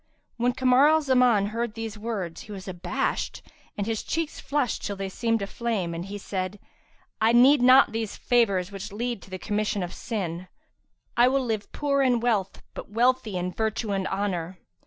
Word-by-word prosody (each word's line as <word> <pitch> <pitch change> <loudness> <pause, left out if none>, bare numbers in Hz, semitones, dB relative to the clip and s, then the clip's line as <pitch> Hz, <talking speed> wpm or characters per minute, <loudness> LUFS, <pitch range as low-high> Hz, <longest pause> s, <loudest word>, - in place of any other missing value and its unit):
'"[FN#336] - - -43
When 245 0 +3
Kamar 255 +2 +5
al 315 0 +4
Zaman 250 -6 +4
heard 230 +1 -3
these 225 -1 -5
words, 210 -6 -4
he 215 - -11
was 195 -1 -8
abashed 180 -1 -2 0.3
and 200 - -1
his 225 -1 -2
cheeks 325 -2 -3
flushed 280 -4 -1
till 200 - -3
they 195 0 -4
seemed 225 +1 0
a - - -1
flame; 200 -5 -2
and 170 +1 -5
he 200 +1 -6
said, 190 0 -4 0.6
"I 225 +1 +4
need 260 +3 +6
not 255 +2 +7
these 225 -1 -3
favours 200 -7 +2
which 200 +1 -7
lead 235 0 -3
to - - -14
the 185 - -5
commission 210 0 -1
of 175 - -5
sin; 185 -6 -4 0.7
I 240 +1 +6
will 265 0 +1
live 215 -3 -3
poor 280 -1 0
in 250 -3 +3
wealth 220 -5 -1
but - - -8
wealthy 230 -2 +1
in 180 +1 -2
virtue 220 +1 -2
and 195 -1 -1
honour." 190 -3 -2
215 Hz, 190 wpm, -26 LUFS, 195-245 Hz, 0.7 s, not